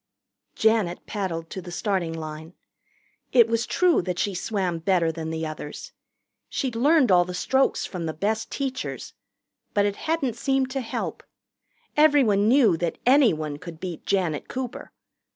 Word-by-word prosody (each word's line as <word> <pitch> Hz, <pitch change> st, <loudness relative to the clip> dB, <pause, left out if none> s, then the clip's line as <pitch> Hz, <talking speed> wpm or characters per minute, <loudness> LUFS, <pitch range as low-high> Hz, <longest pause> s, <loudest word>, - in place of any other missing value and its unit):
Janet 220 Hz, -6 st, +1 dB
paddled 170 Hz, -6 st, -4 dB
to 190 Hz, -, -5 dB
the 175 Hz, -, -9 dB
starting 180 Hz, -3 st, -1 dB
line. 160 Hz, +1 st, -7 dB, 0.8 s
It 235 Hz, -3 st, +7 dB
was 230 Hz, 0 st, 0 dB
true 360 Hz, -2 st, +3 dB
that 180 Hz, 0 st, -3 dB
she 200 Hz, +2 st, 0 dB
swam 180 Hz, -2 st, -2 dB
better 170 Hz, -1 st, +2 dB
than 160 Hz, 0 st, -5 dB
the 160 Hz, 0 st, -3 dB
others. 155 Hz, -1 st, -7 dB, 0.6 s
She'd 255 Hz, -4 st, -2 dB
learned 280 Hz, -1 st, +4 dB
all 175 Hz, -1 st, +6 dB
the 180 Hz, 0 st, -6 dB
strokes 265 Hz, +8 st, +1 dB
from 175 Hz, -4 st, -5 dB
the 160 Hz, -, -3 dB
best 215 Hz, +7 st, -1 dB
teachers. 265 Hz, -2 st, -4 dB, 0.6 s
But 205 Hz, -1 st, +4 dB
it 205 Hz, -1 st, -1 dB
hadn't 290 Hz, -8 st, -1 dB
seemed 270 Hz, 0 st, 0 dB
to 270 Hz, 0 st, -2 dB
help. 235 Hz, -, -4 dB, 0.7 s
Everyone 270 Hz, -10 st, +4 dB
knew 230 Hz, -8 st, +5 dB
that 170 Hz, 0 st, -2 dB
anyone 190 Hz, -, +3 dB
could 165 Hz, -1 st, -9 dB
beat 180 Hz, -2 st, -6 dB
Janet 180 Hz, -7 st, -1 dB
Cooper. 255 Hz, -2 st, -6 dB
195 Hz, 150 wpm, -25 LUFS, 170-250 Hz, 0.8 s, It